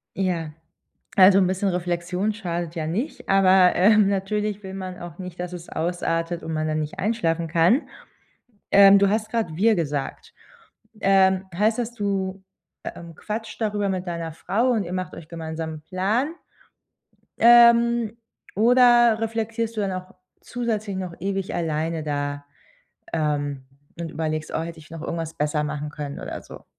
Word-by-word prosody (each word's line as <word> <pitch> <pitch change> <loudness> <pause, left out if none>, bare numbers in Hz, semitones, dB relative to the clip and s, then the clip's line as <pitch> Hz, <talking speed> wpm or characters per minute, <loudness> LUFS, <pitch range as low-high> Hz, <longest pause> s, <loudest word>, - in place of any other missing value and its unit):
Ja. 175 -5 -1 0.7
Also 190 0 +8
'n 185 - +3
bisschen 190 +2 0
Reflexion 180 +3 -1
schadet 175 -5 -4
ja 155 -2 -3
nicht, 225 - -4
aber, 190 -1 +5
ähm, 210 +1 +5
natürlich 205 +1 -2
will 190 0 -7
man 185 -1 -6
auch 175 -1 -9
nicht, 180 -2 -8
dass 180 0 -4
es 175 -1 -9
ausartet 165 0 -2
und 160 - -5
man 155 0 -1
dann 155 0 -1
nicht 155 +6 -6
einschlafen 170 -6 0
kann. 170 - +3 0.8
Ähm, 200 0 +8
du 200 -1 +4
hast 215 +1 -1
gerade 220 -9 -1
wir 220 +5 +4
gesagt. 145 -5 -4 0.7
Ähm, 190 -1 +4
heißt 215 +5 +1
dass 240 -1 -2
du, 195 -3 -2 0.4
ähm, 170 -1 -8
quatscht 220 +5 -6
darüber 205 -2 0
mit 185 -1 -3
deiner 170 -2 -4
Frau 215 +10 0
und 220 -6 +1
ihr 175 - -7
macht 185 0 -4
euch 155 - -11
gemeinsam 160 -1 -5
'n 150 - -11
Plan? 210 - -1 1.1
Ähm, 235 -1 +6 0.4
oder 240 0 +5
reflektierst 225 0 -2
du 215 - -1
dann 195 - -1
auch 185 0 -7 0.3
zusätzlich 220 -5 -3
noch 185 -2 -5
ewig 195 +1 -3
alleine 160 0 -2
da, 145 -1 -3 0.7
ähm, 145 -3 -1 0.4
und 165 -2 -4
überlegst: 155 -1 -3
„Oh, - - 0
hätte 165 0 -7
ich 155 - -16
noch 165 -2 -7
irgendwas 165 -1 -4
besser 150 0 0
machen 150 0 -4
können?“ 145 -1 -6
oder - - -6
so? - - -13
185 Hz, 160 wpm, -24 LUFS, 165-210 Hz, 1.1 s, Also